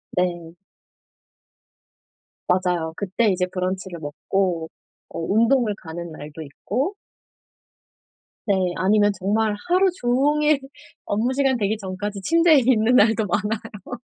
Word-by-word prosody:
네. 175 -2 -1 2.0
맞아요. 180 -3 0
그때 200 +3 0
이제 180 -1 0
브런치를 185 -1 -3
먹고 165 +3 -2 0.4
어 - - -6
운동을 225 +5 +2
가는 170 0 -7
날도 150 0 -9
있고 230 - -3 1.5
네. 200 - +3 0.2
아니면 205 +2 +3
정말 210 +3 0
하루 375 +2 +4
종일 290 +4 +2 0.5
업무시간 260 +5 +1
되기 215 0 0
전까지 200 +1 -5
침대에 330 - +4
있는 240 -1 +3
날도 220 -1 +4
많아요. 215 +3 -4
205 Hz, 225 characters per minute, -22 LUFS, 180-240 Hz, 2.0 s, 하루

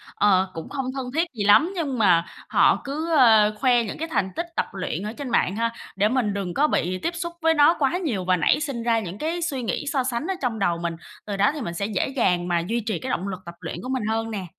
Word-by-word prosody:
ờ, 190 -2 +3
cũng 165 - -7
không 270 -2 -3
thân 265 -2 -3
thiết 330 +2 +2
gì 215 -4 -3
lắm, 250 - +5
nhưng 290 -7 -2
mà 175 -5 +4 0.2
họ - - +4
cứ, 310 +4 -3
ơ, 220 -6 +6
khoe 245 -2 +3
những 210 - -6
cái 325 - -3
thành 200 - 0
tích 335 - -2
tập - - +1
luyện 185 -2 -4
ở 210 +1 -4
trên 280 0 -6
mạng 200 -5 +1
ha? 230 +1 0 0.2
Để 205 +2 +2
mình 235 -4 0
đừng 195 -3 -3
có 295 +2 +3
bị 185 - 0
tiếp 340 +1 -3
xúc 340 0 -4
với 325 0 +4
nó 295 +1 +5
quá 290 +4 +2
nhiều 245 - -2
và 185 0 +3
nảy 215 - +2
sinh 275 -6 -3
ra 230 -1 +2
những 190 -2 -6
cái 330 +7 -2
suy 285 -7 -2
nghĩ 235 +5 -3
so 265 -3 +1
sánh 250 +4 -2
ở 385 - -1
trong 240 -4 -1
đầu 175 -3 +1
mình, 170 0 -3 0.3
từ 205 -2 -4
đó 205 +4 +4
thì 300 - -5
mình 170 - -4
sẽ 185 +4 -2
dễ 200 -3 -1
dàng 180 -10 0
mà 175 -1 +1
duy 220 +8 -1
trì 220 - -2
cái 260 - -5
động 190 -5 -2
lực 190 -2 -4
tập 170 0 -9
luyện - - -5
của 255 - -7
mình 260 -3 -1
hơn 225 0 -1
nè. 200 -4 -4
230 Hz, 275 wpm, -24 LUFS, 195-280 Hz, 0.3 s, ơ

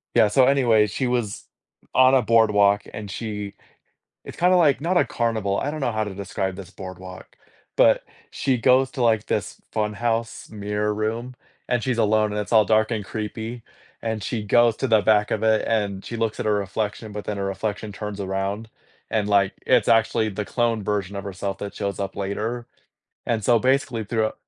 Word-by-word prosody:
Yeah, 110 - +6
so 125 +5 +4
anyway, 120 -6 +4
she 130 +5 -2
was 120 -5 -2 0.5
on 130 +1 +6
a 130 - +5
boardwalk, 105 -3 +4
and 105 -1 -7
she 105 0 -5 0.7
it's - - -10
kinda 180 +1 +4
like, 150 -6 +3
not 175 +4 +1
a - - +4
carnival, 110 -4 -1
I 145 - -2
don't 155 - -5
know 130 -4 0
how 110 -1 -1
to 105 -2 -5
describe 95 -1 -3
this 95 -2 -9
boardwalk, 95 -1 -10 0.4
but - - +5 0.3
she 130 -2 0
goes 130 +2 +3
to, 130 - -4
like, 110 -2 +2
this - - -3
fun 105 -1 -1
house 115 +1 -2
mirror 105 0 -2
room, 115 +4 -3 0.4
and 120 -1 +1
she's 125 0 -1
alone, 110 -1 +2
and 105 - -1
it's 105 - -8
all 110 -2 +6
dark 110 +1 +2
and 110 -3 -2
creepy, 110 +3 -5 0.4
and 110 -1 -3
she 110 0 -3
goes 120 +2 +4
to 135 - -1
the 110 -3 +4
back 105 0 +3
of 110 - -1
it, 110 -1 +3
and 100 -4 -1
she 115 - -6
looks 115 -1 -1
at - - -4
her 105 - +2
reflection, 105 +2 -3
but 105 0 -5
then 105 - -3
her 100 - -2
reflection 105 +2 -3
turns 105 0 -6
around, 100 +3 -3 0.4
and, 105 -2 0
like, 100 -2 +3
it's - - +3
actually 110 -1 +3
the 105 +1 -4
cloned 115 -2 0
version 100 -1 -2
of 100 - -4
herself 100 0 -4
that 100 - -6
shows 100 -1 -3
up 100 -1 -3
later. 110 +5 -3 0.6
And 115 -3 0
so 120 +3 +4
basically 130 -2 +1
throughou 110 +1 -1
110 Hz, 195 wpm, -23 LUFS, 100-115 Hz, 0.7 s, Yeah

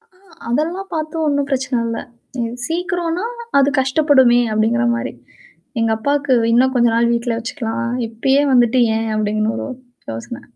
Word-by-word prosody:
ஆ - - -26 0.3
அதெல்லாம் 335 +10 -1
பாத்து 310 0 -3
ஒண்ணும் 285 -1 0
பிரச்சன 260 -2 0
இல்ல. 230 0 -3 0.4
இது 230 0 -2 0.2
சீக்கிரோம்ன்னா 350 +2 -2 0.3
அது 280 +1 +3
கஷ்டப்படுமே 265 -3 +4
அப்படிங்கிற 225 +3 +1
மாரி. 235 - -4 0.7
எங்க 225 -1 +2
அப்பாவுக்கு, 285 +2 0 0.2
"இன்னும் 260 +2 +3
கொஞ்ச 240 -1 +4
நாள் 235 0 +3
வீட்ல 235 -1 -1
வச்சுக்கலாம். 235 -1 -3 0.2
இப்பயே 265 +5 +2
வந்துட்டு 245 0 +4 0.2
ஏன்?" 225 0 -2
அப்படின்னு 215 +1 0
ஒரு - - -4 0.4
யோசனை. 115 - -7
250 Hz, 140 wpm, -18 LUFS, 230-285 Hz, 0.7 s, கஷ்டப்படுமே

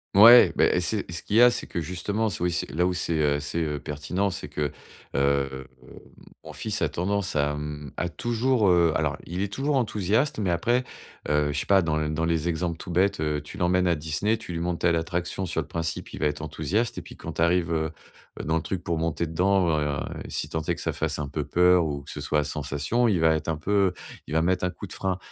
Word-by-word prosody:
Mouais. 115 +4 +9
Beh, - - +4
eh, - - +2
c'est 100 +2 -2
ce 85 - -4
qu'il 105 - -3
y 115 - +7
a 125 0 +8
c'est - - -3
que 85 - -3
justement 95 +7 -2
s - - -4
oui, 90 - +1
c'est 85 -4 -2
là 80 +5 +1
où 90 - 0
c'est, 85 -1 -1
heu, 75 -2 +2
c'est, 75 +3 -3
heu, 75 -2 -2
pertinent, 75 +8 -2
c'est - - -6
que, 75 -2 -2 0.4
heu, 70 -1 0 0.8
mon - - -9
fils - - -3
a - - +2
tendance 100 +1 -1
à, 75 0 +1
mmh, 75 -1 -6
à 85 - -2
toujours, 120 +1 +1
heu, 85 -2 +4
alors, - - 0
il 90 +2 -3
est 100 0 -4
toujours 140 +4 0
enthousiaste, 110 +1 +1
mais 100 -4 0
après, 120 +9 +1 0.5
heu, 75 0 +2
je 70 - -1
sais - - -4
pas, 95 -2 +5
dans 80 -2 0
l 75 0 -1
dans 80 +2 -1
les 85 0 0
exemples 85 0 -2
tout - - -9
bêtes, 90 +2 +2
heu, 75 -1 0
tu 75 +6 -10
l'emmènes 90 0 +2
à 85 - +4
Disney, 80 +9 -1
tu 110 -5 -9
lui 85 - -3
montres 85 0 -2
telle 85 -1 +3
attraction 85 +3 -2
sur 80 -2 -1
le 70 - -9
principe, 80 -1 -4
il - - -8
va - - 0
être 75 0 -1
enthousiaste 105 +10 -1
et - - -5
puis - - -12
quand - - -7
tu - - -3
arrives, 85 0 +2
heu 80 -1 0 0.5
heu, - - -4
dans 80 - +1
le - - -1
truc 90 +2 -4
pour 85 -2 -1
monter 80 0 -1
dedans, 90 +3 +2
ben, 75 -2 -1 0.2
si - - -3
tant 80 - -2
est - - -1
que - - -8
ça - - -1
fasse 80 -1 -2
un 75 - -3
peu 75 +2 -3
peur 90 +3 +4
ou 70 -2 -3
que - - -9
ce 75 - -6
soit 75 +1 +1
à - - +1
sensations, 75 - -1
il 100 -6 +2
va 80 0 +4
être 80 - -4
un 80 - -1
peu 95 +3 +1 0.3
il - - -6
va 80 - +3
mettre 90 +2 +1
un 90 - +2
coup 95 +3 -9
de - - -8
frein. 95 -2 -2
85 Hz, 260 wpm, -26 LUFS, 75-95 Hz, 0.8 s, Mouais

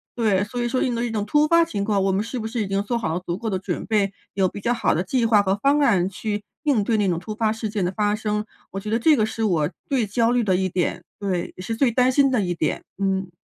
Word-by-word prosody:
对。 210 -5 +2
所 245 +4 -5
以 - - 0
说 255 +2 0
应 245 - 0
对 235 +1 -1
这 230 - -3
种 210 -2 -1
突 295 +5 +3
发 335 +1 +5
情 205 -12 -3
况， 200 -2 +1
我 195 - +2
们 195 +2 0
是 235 +2 -5
不 220 - -3
是 225 -1 -2
已 - - -4
经 195 +1 0
做 235 +3 -1
好 190 -9 -2
了 175 - -1
足 175 0 -4
够 220 0 -3
的 190 - -1
准 - - -4
备？ 205 -3 +1 0.2
有 190 -1 +2
比 - - -8
较 235 +4 0
好 230 - +1
的 175 - 0
计 230 +4 +1
划 210 -2 +5
和 190 0 +1
方 280 +7 +2
案 195 -9 +3
去 205 +2 -4 0.2
应 275 -9 +2
对 225 +1 +1
那 205 -2 +2
种 170 -2 0
突 210 +4 -6
发 220 -1 +1
事 220 -1 -4
件 205 -3 -1
的 180 - -1
发 210 +1 +1
生， 210 -1 -2 0.3
我 195 - -4
觉 210 +2 -6
得 225 - +2
这 300 +6 +4
个 220 - +2
是 225 0 -3
我 160 -7 +1 0.2
最 255 -6 +1
焦 230 +3 +2
虑 245 -1 +2
的 190 -3 +2
一 190 0 +1
点， 180 -1 -2 0.2
对。 185 -4 -2
也 185 - -9
是 225 +4 -3
最 245 +1 +2
担 250 +2 +3
心 275 +1 +4
的 245 - +2
一 180 -2 -1
点， 155 - -1 0.2
嗯。 190 -1 0
210 Hz, 320 characters per minute, -23 LUFS, 195-235 Hz, 0.3 s, 发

